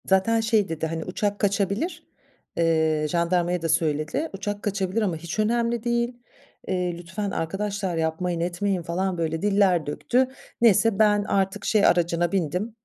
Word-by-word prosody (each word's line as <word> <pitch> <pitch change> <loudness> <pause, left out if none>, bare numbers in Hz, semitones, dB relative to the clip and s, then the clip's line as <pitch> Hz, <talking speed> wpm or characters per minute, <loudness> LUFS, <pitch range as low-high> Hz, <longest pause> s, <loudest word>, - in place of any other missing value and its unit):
Zaten 190 +4 +3
şey 220 -3 +2
dedi, 160 0 -2
hani 165 0 -4
uçak 205 +2 -2
kaçabilir, 200 - -1 0.5
eee, 160 -2 +2
jandarmaya 175 0 +1
da 165 - -2
söyledi, 160 - 0
uçak 205 +1 -4
kaçabilir 200 +1 -1
ama 190 -6 0
hiç 170 +5 -6
önemli 235 +1 +1
değil, 240 0 0 0.5
eee, 180 -2 -1
lütfen 185 +4 -4
arkadaşlar 195 +2 -2
yapmayın 165 +2 -1
etmeyin 180 +2 -1
falan 180 +2 -2
böyle 160 -1 -2
diller 195 -5 +3
döktü. 250 - +1 0.3
Neyse, 225 -2 +4
ben 210 -1 +4
artık 195 0 -1
şey 215 -2 +3
aracına 175 0 +2
bindim, 190 +4 -1
190 Hz, 145 wpm, -25 LUFS, 170-210 Hz, 0.5 s, Neyse